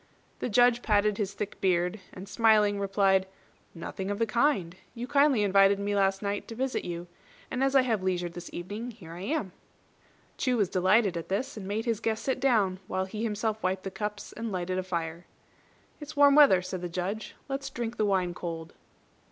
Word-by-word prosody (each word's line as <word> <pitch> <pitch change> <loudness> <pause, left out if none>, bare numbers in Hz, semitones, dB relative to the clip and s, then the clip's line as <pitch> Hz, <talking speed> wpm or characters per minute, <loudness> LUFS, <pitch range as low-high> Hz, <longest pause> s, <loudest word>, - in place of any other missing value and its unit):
The - - -2
Judge 245 +2 +4
parted 210 -1 +2
his 200 -1 -2
thick 210 -1 -5
beard, 180 +1 +1
and 185 +2 -9
smiling, 210 -2 +3
replied, 195 -1 +2 0.5
"Nothing 190 +3 -5
of 205 - -2
the 230 - +2
kind. 220 - +1 0.2
You 240 +1 -4
kindly 280 -4 +3
invited 195 0 +5
me 205 +1 -1
last 195 0 +1
night 200 0 -2
to 225 - -7
visit 260 +2 -1
you; 175 0 -5 0.5
and 260 - 0
as 270 0 +1
I 265 - +6
have 225 -6 0
leisure 180 -2 0
this 175 0 -8
evening, 205 +7 -5
here 205 -9 -11
I 170 +2 -8
am." 260 - -2 0.9
Chu 255 -2 +1
was 205 -5 +2
delighted 190 +1 +3
at 165 - -6
this, 250 +9 -2
and 200 -3 -7
made 215 +3 -2
his 230 -3 0
guest 220 -1 -2
sit 265 -1 -1
down, 215 -8 +2
while 190 0 -1
he 210 +3 -6
himself 220 -1 -1
wiped 185 +1 -1
the 195 - -5
cups 210 +1 -5
and 230 -1 -5
lighted 185 0 -2
a - - -2
fire. 170 -2 -4 0.7
"It's 305 0 -9
warm 285 -1 +6
weather," 275 -12 +7
said 185 -1 -5
the 175 - -4
Judge; 185 +5 -4
"let's 275 0 -3
drink 240 -2 -4
the 215 - +2
wine 185 -3 +1
cold." 165 -2 -6
205 Hz, 200 wpm, -28 LUFS, 185-230 Hz, 0.9 s, weather